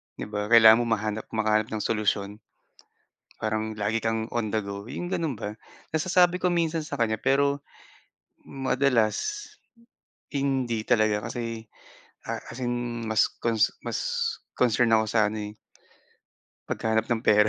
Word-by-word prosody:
di - - -6
ba? 105 0 -2
Kailangan 110 -1 +8
mo 120 - 0
mahanap 110 0 -2
makahanap 110 0 +2
ng 105 - -2
solusyon 105 -2 0 1.0
parang 110 0 -2
lagi 110 +2 +1
kang 115 0 -1
on 115 -2 0
the 110 - +2
go, 100 0 -6
yung 175 +8 -5
gano'n 160 -8 -1
ba? 105 +1 -5 0.4
Nasasabi 180 +2 +3
ko 180 - +1
minsan 165 -1 +1
sa - - -5
kanya 110 -1 +2
pero 140 +3 +2 0.8
madalas 135 - 0 0.9
hindi 130 -5 0
talaga 110 -1 +2
kasi, 115 -1 -5 0.6
ah, - - -2
as 120 - -9
in 120 -1 -2
mas 110 0 +3 0.2
cons 115 -2 +3 0.2
mas - - -2 0.6
concern 120 -1 +3
ako 110 0 +3
sa 110 -2 +4
ano, 105 -1 -4
eh - - -28 1.1
paghahanap 110 0 0
ng 115 -2 -1
pera. 105 0 +5
115 Hz, 140 wpm, -26 LUFS, 110-125 Hz, 1.1 s, Kailangan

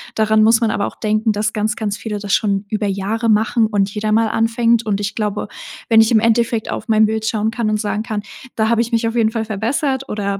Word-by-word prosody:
Daran 215 0 +3
muss 225 +1 +4
man 220 -2 +1
aber 200 - -1
auch - - -9
denken, 215 +1 +1
dass 215 +2 -1
ganz, 215 0 -1
ganz 205 -2 -3
viele 210 -2 -5
das 200 -1 -3
schon 200 -1 +1
über 210 -1 -1
Jahre 205 +4 -1
machen 220 +1 +2
und 200 -2 0
jeder 215 0 -2
mal 225 +1 +3
anfängt, 230 +1 +1
und 205 -1 -1
ich 200 -1 -3
glaube, 210 -1 -2 0.4
wenn 225 -1 +6
ich 225 +2 +2
im 220 - +5
Endeffekt 230 0 +1
auf - - -5
mein 220 -1 +4
Bild 220 0 -2
schauen 220 0 0
kann 230 -1 -2
und 215 0 0
sagen 210 0 -2
kann: 215 -2 -4 0.3
„Da 220 0 +1
habe 230 0 +2
ich 235 +1 -3
mich 230 0 +1
auf 230 - -3
jeden 225 -2 +2
Fall 225 -1 -2
verbessert“ 265 +6 -2
oder 200 -1 -2
220 Hz, 250 wpm, -18 LUFS, 210-225 Hz, 0.4 s, wenn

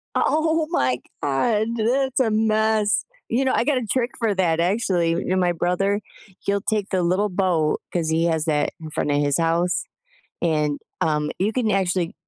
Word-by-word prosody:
O - - +2
oh 315 0 +1
my 130 - +1 0.2
god, 210 - +1
that's 260 +4 +1
a 230 -4 +2
mess. 220 -1 +2 0.2
You 260 +4 +1
know, 260 - +2
I - - +2
got 290 -3 +2
a 250 - -2
trick 245 +2 0
for 225 -3 +1
that 165 -3 +1
actually, 180 -2 +1
you 170 - -1
know, 185 - 0
my 180 -1 +2
brother, 180 +4 0 0.4
he'll 200 0 -1
take 210 -2 -1
the 185 -2 0
little 185 +4 +1
boat 180 -5 +1
'cause 165 -3 -1
he 165 +1 +2
has 160 -2 +1
that 150 -2 +1
in 160 -1 -8
front 150 - -1
of 145 - +2
his 145 -1 +1
house, 170 +2 +1 0.6
and, 150 -3 0 0.2
um, 150 -1 0
you 205 +4 +1
can 225 -3 0
actually 185 -1 0
185 Hz, 190 wpm, -23 LUFS, 165-220 Hz, 0.6 s, O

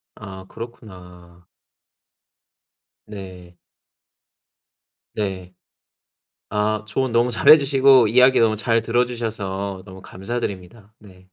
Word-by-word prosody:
아 95 -3 -11
그렇구나. 90 -7 -13 1.6
네. 95 -4 -11 1.6
네. 95 -3 -5 1.0
아 105 0 -2
조언 130 +2 -2
너무 120 +1 +2
잘해 135 +6 +6
주시고 135 -4 +4
이야기 125 +3 +4
너무 110 -1 +2
잘 115 +1 0
들어 120 +2 0
주셔서 100 -5 -5
너무 95 -1 -13
감사드립니다. 100 0 -7
네. 95 -4 -18
105 Hz, 195 characters per minute, -21 LUFS, 95-120 Hz, 1.6 s, 잘해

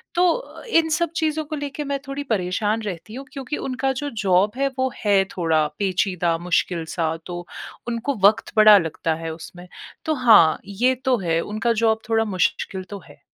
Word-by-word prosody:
तो 360 +8 0
इन 330 -8 +3
सब 340 0 0
चीज़ों 315 -1 0
को 310 +1 -5
लेके 290 0 -5
मैं 280 -1 -2
थोड़ी 275 +1 -4
परेशान 210 -1 -1
रहती 205 0 -6
हूँ, 270 +2 -7
क्योंकि 275 +1 -4
उनका 270 +1 -2
जो 290 - -3
जॉब 190 +2 +3
है, 275 +1 +1
वो 260 0 +1
है 200 -3 +3
थोड़ा 160 -3 +2
पेचीदा, 180 -3 0
मुश्किल-सा 165 -1 -1
तो 175 -1 -6 0.4
उनको 240 +4 -2
वक़्त 220 +2 0
बड़ा 215 -1 +9
लगता 165 -2 -1
है 165 -1 -4
उसमें। 175 +2 -11 0.4
तो 315 - +1
हाँ, 225 - +6
ये 235 +6 +1
तो 260 -1 +3
है 165 -3 0
उनका 215 +4 -1
जॉब 220 -1 +3
थोड़ा 225 0 +2
मुश्किल 190 0 -1
तो 200 - -7
है। - - -17
215 Hz, 175 wpm, -22 LUFS, 180-270 Hz, 0.4 s, बड़ा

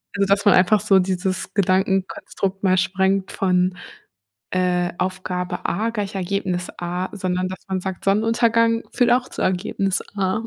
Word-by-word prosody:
Also, 200 -1 +1
dass 200 +1 +2
man 205 - +7
einfach 190 +3 +4
so 200 -3 +4
dieses 185 0 -2
Gedankenkonstrukt 190 0 0
mal 185 -1 +3
sprengt 190 +1 +1
von, 180 -1 +1 0.8
äh, 180 -1 0
Aufgabe 185 -1 -3
A 220 +6 -1
gleich 205 -3 -4
Ergebnis 185 -1 -2
A, 180 +1 -3
sondern 185 -2 -2
dass 185 - -8
man 190 -1 -1
sagt: 190 -1 -6
„Sonnenuntergang 230 +2 +2
führt 245 -1 +3
auch 250 +1 +1
zu - - -5
Ergebnis 190 +1 0
A.“ 195 +3 0
190 Hz, 150 wpm, -22 LUFS, 185-200 Hz, 0.8 s, man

